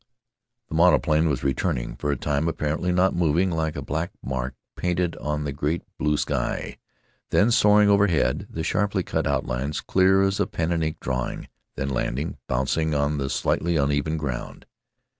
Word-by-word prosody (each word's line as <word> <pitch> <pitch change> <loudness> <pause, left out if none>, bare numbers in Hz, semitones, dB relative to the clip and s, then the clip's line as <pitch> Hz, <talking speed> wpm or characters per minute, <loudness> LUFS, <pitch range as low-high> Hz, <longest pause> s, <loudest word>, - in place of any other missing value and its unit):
The - - -7
monoplane 80 -1 +4
was 65 -4 -1
returning, 60 -3 -1
for 75 - -3
a - - 0
time 75 +4 0
apparently 80 +2 -1
not 90 +2 +3
moving, 85 +2 +2
like 80 -2 -1
a - - -4
black 80 +4 -2
mark 65 -1 -3 0.2
painted 90 -1 -1
on 75 0 -2
the 75 - -2
great 75 +4 -2 0.2
blue 75 -1 +1
sky; - - -2 0.5
then 110 +4 +3
soaring 105 -2 +5
overhead, 100 -5 +2
the 80 - -4
sharply 100 +1 0
cut - - -1
outlines 70 +1 -1
clear 95 +1 +3
as 95 0 +1
a - - +2
pen 80 +1 -2
and 85 -1 +1
ink 80 0 -2
drawing; 65 0 -3 0.3
then 70 - -2
landing, 70 +3 -2
bouncing 75 +5 0
on 70 +1 0
the 70 -1 -2
slightly 85 +4 0
uneven 75 +2 +1
ground. 70 -5 -5
80 Hz, 165 wpm, -24 LUFS, 70-85 Hz, 0.5 s, soaring